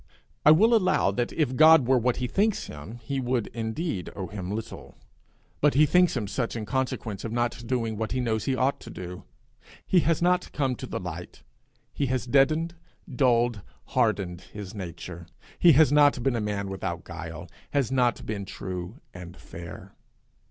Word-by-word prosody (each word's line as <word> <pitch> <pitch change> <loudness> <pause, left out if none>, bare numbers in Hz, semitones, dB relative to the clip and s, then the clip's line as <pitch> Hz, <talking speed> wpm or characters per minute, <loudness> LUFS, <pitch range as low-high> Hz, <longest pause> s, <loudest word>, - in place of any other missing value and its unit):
I - - +7
will 215 +10 +6
allow 185 - +3
that 120 +4 -1
if 145 -5 0
God 155 -3 +7
were 130 -1 +4
what 125 +1 +1
he 125 - -2
thinks 200 - +1
him 75 +10 -9
he 135 +4 -2
would 125 -3 0
indeed 110 - -3
owe 95 - -4
him 90 0 -6
little; 110 +2 -6 0.6
but 150 -2 +3
he 150 +2 +6
thinks 180 -1 +3
him 105 -4 -2
such 115 +3 -2
in 110 -2 -4
consequence 125 -5 -3
of 115 - -4
not 120 0 -2
doing 115 -4 -1
what 110 0 -3
he 130 - -1
knows 110 -3 -1
he 135 - +1
ought 130 +2 +1
to - - -11
do. 90 0 -8 0.6
He 185 - +4
has 165 -1 +1
not 180 +1 +1
come 135 -3 0
to - - -7
the - - -4
light. - - -8 0.5
He 140 - -1
has 130 -1 -1
deadened, 155 +6 +2 0.4
dulled, 120 -3 +2 0.3
hardened 100 -8 0
his 105 -3 -8
nature. 85 -3 -8 0.3
He 170 -2 +7
has 150 +2 +5
not 145 -4 +4
been 135 -2 +1
a 115 - -1
man 100 -1 -2
without 95 -2 -4
guile, 85 -1 -8 0.2
has 140 -5 0
not 125 -3 +1
been 100 -2 -4
true 95 - -6
and 90 0 -10
fair. 85 +1 -10
120 Hz, 180 wpm, -26 LUFS, 100-140 Hz, 0.6 s, I